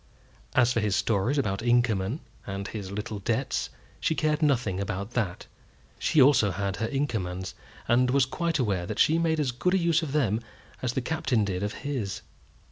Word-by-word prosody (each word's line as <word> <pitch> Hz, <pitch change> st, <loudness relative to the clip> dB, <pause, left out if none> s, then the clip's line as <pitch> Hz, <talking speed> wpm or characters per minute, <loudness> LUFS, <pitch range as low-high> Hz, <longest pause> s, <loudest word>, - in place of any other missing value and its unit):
As 125 Hz, -1 st, +4 dB
for 115 Hz, -, +1 dB
his 105 Hz, -2 st, +1 dB
stories 115 Hz, +7 st, +1 dB
about 100 Hz, -8 st, 0 dB
Inkerman, 120 Hz, -, +1 dB, 0.3 s
and 100 Hz, 0 st, -4 dB
his 100 Hz, -3 st, -6 dB
little 105 Hz, +1 st, -4 dB
debts, 115 Hz, +6 st, -1 dB, 0.3 s
she 160 Hz, -, +1 dB
cared 155 Hz, 0 st, +1 dB
nothing 125 Hz, -10 st, +1 dB
about 100 Hz, +1 st, -3 dB
that. 110 Hz, -8 st, -2 dB, 0.5 s
She 155 Hz, -, +2 dB
also 130 Hz, -6 st, +6 dB
had 100 Hz, +1 st, -2 dB
her 110 Hz, -, -1 dB
Inkermans, 100 Hz, -10 st, -2 dB, 0.3 s
and 125 Hz, +1 st, +4 dB
was 135 Hz, 0 st, +4 dB
quite 165 Hz, +5 st, -1 dB
aware 100 Hz, -, 0 dB
that -, -, -4 dB
she 160 Hz, +2 st, +4 dB
made 160 Hz, -1 st, +1 dB
as 140 Hz, -4 st, +1 dB
good 180 Hz, +10 st, +1 dB
use 170 Hz, -2 st, +3 dB
of 155 Hz, -4 st, -4 dB
them 115 Hz, -7 st, +1 dB, 0.4 s
as 125 Hz, -1 st, -1 dB
the 130 Hz, -, 0 dB
Captain 125 Hz, -6 st, 0 dB
did 95 Hz, -2 st, -2 dB
of 105 Hz, +2 st, -2 dB
his. 125 Hz, -9 st, -3 dB
120 Hz, 180 wpm, -27 LUFS, 100-140 Hz, 0.5 s, also